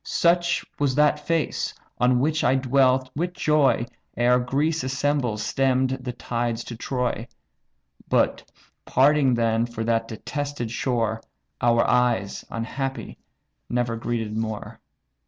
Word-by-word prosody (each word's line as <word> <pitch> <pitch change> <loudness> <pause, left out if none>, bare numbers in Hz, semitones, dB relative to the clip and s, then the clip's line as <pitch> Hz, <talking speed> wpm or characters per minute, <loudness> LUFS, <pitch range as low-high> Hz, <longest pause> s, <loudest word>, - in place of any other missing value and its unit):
Such 175 0 +2
was 140 -3 +1
that 150 0 +2
face, 165 -2 -1 0.2
on 125 0 +3
which 155 +4 +1
I 130 - +4
dwelt 130 0 +2
with 175 +4 -2
joy 150 -8 +2 0.3
Ere 125 +1 +4
Greece 145 +6 0
assembled 130 -4 0
stemm'd 130 +2 +1
the 125 - -3
tides 120 -1 -2
to 120 - -7
Troy; 125 -1 -2 0.8
But, - - +2 0.4
parting 135 -1 +4
then 115 0 +1
for 120 -1 -5
that 115 0 0
detested 140 +1 -4
shore, 115 -3 -1 0.4
Our 120 -1 +3
eyes, 120 -5 +1
unhappy 135 +4 -4 0.5
never 120 -1 0
greeted 115 -2 -3
more." 110 -1 -4
125 Hz, 120 wpm, -24 LUFS, 115-140 Hz, 0.8 s, I